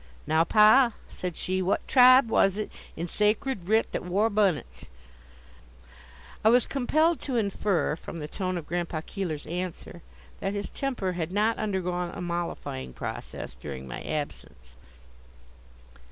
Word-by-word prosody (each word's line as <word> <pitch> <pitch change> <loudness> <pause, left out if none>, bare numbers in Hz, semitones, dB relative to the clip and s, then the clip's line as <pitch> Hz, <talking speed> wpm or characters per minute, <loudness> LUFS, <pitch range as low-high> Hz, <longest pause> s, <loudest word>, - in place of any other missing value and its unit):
"Now, 160 +1 +3
pa," 220 +6 +6
said 180 -2 -6
she; 185 0 -1
"what 185 +2 0
tribe 255 -1 +7
was 195 -3 +3
it 215 - -4 0.3
in 170 - -3
sacred 210 0 0
writ 220 +1 +3
that - - -3
wore 200 +5 +1
bunnits?" 200 -7 0 1.6
I 220 - +6
was 245 +2 +5
compelled 310 +5 +1
to 265 - -3
infer 200 -7 0
from 170 - -9
the 150 -2 -5
tone 185 +2 -3
of 165 - -6
Grandpa 170 -2 -2
Keeler's 165 -7 -4
answer 175 0 -5 0.4
that 195 - -2
his 205 0 -4
temper 250 -9 -2
had 175 -1 -3
not 215 +3 +1
undergone 180 -4 -1
a - - -6
mollifying 170 - -4
process - - -6
during 65 -2 -8
my 65 - -6
absence. 105 - -6
185 Hz, 140 wpm, -27 LUFS, 170-215 Hz, 1.6 s, tribe